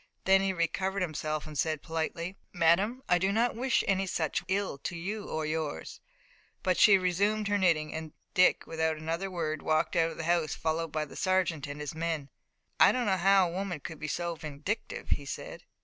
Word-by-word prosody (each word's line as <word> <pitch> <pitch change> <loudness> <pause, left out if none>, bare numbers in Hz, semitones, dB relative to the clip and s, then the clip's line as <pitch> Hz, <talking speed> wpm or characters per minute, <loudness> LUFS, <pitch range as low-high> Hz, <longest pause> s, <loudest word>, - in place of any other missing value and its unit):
Then 195 0 +6
he 195 0 +1
recovered 185 +2 -1
himself 155 -2 -3
and 155 -1 -9
said 155 0 -1
politely: 165 +2 -3 0.2
"Madame, 190 +9 +2
I 180 - +4
do 190 +3 +1
not 230 +3 +1
wish 255 +2 +1
any 195 -1 +1
such 160 -4 -1
ill 190 -6 -1
to 170 - -4
you 200 +5 -4
or 155 0 -2
yours." 155 -1 -4 0.6
But 185 -1 +2
she 210 - +8
had 190 -1 +5
resumed 200 +4 +1
her 205 0 +2
knitting, 165 -5 +2
and 160 -1 -5 0.2
Dick, 185 -2 +4
without 160 -1 -1
another 165 +5 -3
word, 155 -4 -2
walked 155 +1 +1
out 165 -1 +3
of 165 - -9
the 165 - -4
house, 170 -2 +1
followed 160 0 -1
by 155 0 -1
the 145 - -13
sergeant 180 -6 +1
and 145 +1 -6
his 150 +2 -4
men. 160 -3 -2 0.5
"I - - +8
did 255 - 0
not 190 -2 +1
know 195 -1 +6
a - - -5
woman 185 -4 -3
could 160 +2 -8
be 155 - -4
so 170 +2 -2
vindictive," 155 +6 -5
he 145 - 0
said. - - -7
170 Hz, 205 wpm, -30 LUFS, 155-190 Hz, 0.6 s, she